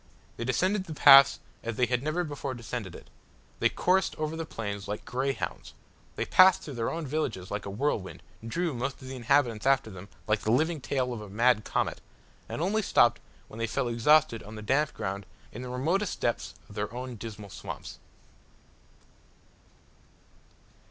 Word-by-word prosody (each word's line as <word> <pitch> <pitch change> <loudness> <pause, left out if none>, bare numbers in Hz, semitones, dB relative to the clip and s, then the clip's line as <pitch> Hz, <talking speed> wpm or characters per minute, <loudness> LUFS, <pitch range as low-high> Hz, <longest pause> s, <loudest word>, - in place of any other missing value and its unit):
They 115 - -3
descended 185 - +1
the 160 - -7
pass 140 -1 +8 0.2
as 115 -1 -4
they 125 - +3
had 125 -1 0
never 155 +5 -1
before 145 -4 -5
descended 115 -5 -6
it; - - -12 0.5
they - - +4
coursed 190 +1 +1
over 155 +1 -3
the 165 0 -5
plains 100 -5 -5
like 105 +1 -5
grey 130 +2 -1
hounds; - - -6 0.4
they - - -2
passed 185 0 +6
through 145 - -7
their 115 -2 -1
own 165 -1 -4
villages 130 -10 -3
like 100 -1 -3
a - - -4
whirlwind; 105 -2 -2 0.2
drew 165 +8 -1
most 130 +2 -3
of - - -9
the 130 - -6
inhabitants 125 -2 +1
after 135 -5 +3
them 95 +1 -10 0.2
like 105 0 +1
the - - -2
living 155 +5 +1
tail 130 -2 -1
of 115 - -6
a 105 - -9
mad 115 +2 +3
comet, - - -1 0.5
and 160 - -3
only 210 +4 +1
stopped 120 - +3 0.3
when 110 - -11
they 115 - 0
fell 125 +3 -1
exhausted 120 +1 +3
on 105 +2 -10
the 110 - -8
damp 140 +6 +2
ground 100 -1 -4 0.2
in 120 - -8
the 125 - -6
remotest 165 +11 -1
depths 120 - -2
of - - -13
their 105 +1 -3
own 125 +1 -6
dismal 105 -2 -8
swamps. - - -8
125 Hz, 180 wpm, -28 LUFS, 110-150 Hz, 0.5 s, pass